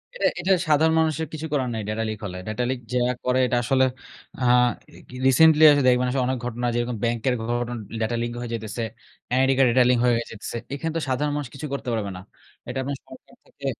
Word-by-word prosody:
এটা, -, -, -1 dB
এটা 195 Hz, -, 0 dB, 0.2 s
সাধারণ 155 Hz, +1 st, +4 dB
মানুষের 160 Hz, 0 st, 0 dB
কিছু 155 Hz, 0 st, -5 dB
করার 130 Hz, -4 st, 0 dB
নাই 110 Hz, -, -3 dB
ডেটা 110 Hz, +1 st, -1 dB
লিক 110 Hz, -, -4 dB
হলে। 90 Hz, -2 st, -6 dB
ডেটা 110 Hz, +3 st, -2 dB
লিক 130 Hz, -1 st, -2 dB
যারা 125 Hz, 0 st, +2 dB
করে 125 Hz, 0 st, +2 dB
এটা 125 Hz, -, +1 dB
আসলে 130 Hz, +1 st, +3 dB, 0.6 s
আ -, -, 0 dB, 0.5 s
re -, -, -14 dB, 0.3 s
recently 155 Hz, +4 st, +6 dB
আসলে 145 Hz, -1 st, +3 dB
দেখবেন 125 Hz, 0 st, +3 dB
আসলে 130 Hz, -1 st, 0 dB
অনেক 130 Hz, 0 st, 0 dB
ঘটনা 125 Hz, 0 st, -3 dB
যেরকম 120 Hz, -1 st, -1 dB
ব্যাংকের 120 Hz, +2 st, 0 dB
ঘটনা 120 Hz, +1 st, -2 dB, 0.3 s
ডেটা 110 Hz, +2 st, 0 dB
লিক 120 Hz, -, -2 dB
হয়ে 120 Hz, -1 st, -5 dB
যাইতেছে। 110 Hz, 0 st, -4 dB, 0.5 s
এনআইডি 130 Hz, +1 st, +3 dB
কার্ডের 130 Hz, -3 st, +5 dB
ডেটা 130 Hz, -, +5 dB
লিক 125 Hz, -1 st, +3 dB
হয়ে 120 Hz, -1 st, +4 dB
যাইতেছে। 115 Hz, +1 st, -6 dB, 0.2 s
এখানে 160 Hz, +3 st, -3 dB
তো -, -, -2 dB
সাধারণ 145 Hz, +3 st, 0 dB
মানুষ 145 Hz, -3 st, -3 dB
কিছুই 145 Hz, +2 st, -6 dB
করতে 135 Hz, -, -4 dB
পারবে 105 Hz, -3 st, -2 dB
না। 90 Hz, -, -9 dB, 0.5 s
এটা 125 Hz, +2 st, -5 dB
আপনার 140 Hz, +1 st, -3 dB
সরকার -, -, -15 dB
থেকে -, -, -13 dB
125 Hz, 215 wpm, -24 LUFS, 120-140 Hz, 0.6 s, recently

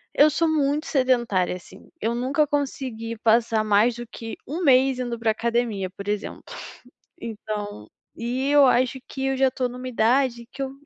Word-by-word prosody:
eu 295 Hz, +2 st, +7 dB
sou 320 Hz, +2 st, +1 dB
muito 300 Hz, 0 st, +1 dB
sedentária 240 Hz, -, +1 dB
assim, 185 Hz, +2 st, -14 dB
eu 230 Hz, -3 st, -1 dB
nunca 265 Hz, +5 st, +1 dB
consegui 260 Hz, -6 st, -3 dB
passar 225 Hz, 0 st, +2 dB
mais 215 Hz, +3 st, +3 dB
do 240 Hz, 0 st, -7 dB
que 225 Hz, -1 st, -8 dB
1 330 Hz, +6 st, -3 dB
mês 265 Hz, -2 st, +4 dB
indo 240 Hz, -2 st, -3 dB
pra 230 Hz, -1 st, +1 dB
academia 225 Hz, -4 st, -1 dB
por 200 Hz, +1 st, -10 dB
exemplo. 205 Hz, 0 st, -3 dB, 0.8 s
Então 210 Hz, -, -6 dB, 0.3 s
e 250 Hz, +3 st, -2 dB
eu 290 Hz, -1 st, +6 dB
acho 255 Hz, +1 st, +2 dB
que 270 Hz, 0 st, -3 dB
eu 270 Hz, 0 st, 0 dB
já 265 Hz, 0 st, +4 dB
estou 255 Hz, 0 st, -2 dB
numa 250 Hz, +1 st, -7 dB
idade 240 Hz, 0 st, +1 dB
que 270 Hz, +1 st, -4 dB
eu 265 Hz, -, -4 dB
240 Hz, 170 wpm, -24 LUFS, 225-270 Hz, 0.8 s, eu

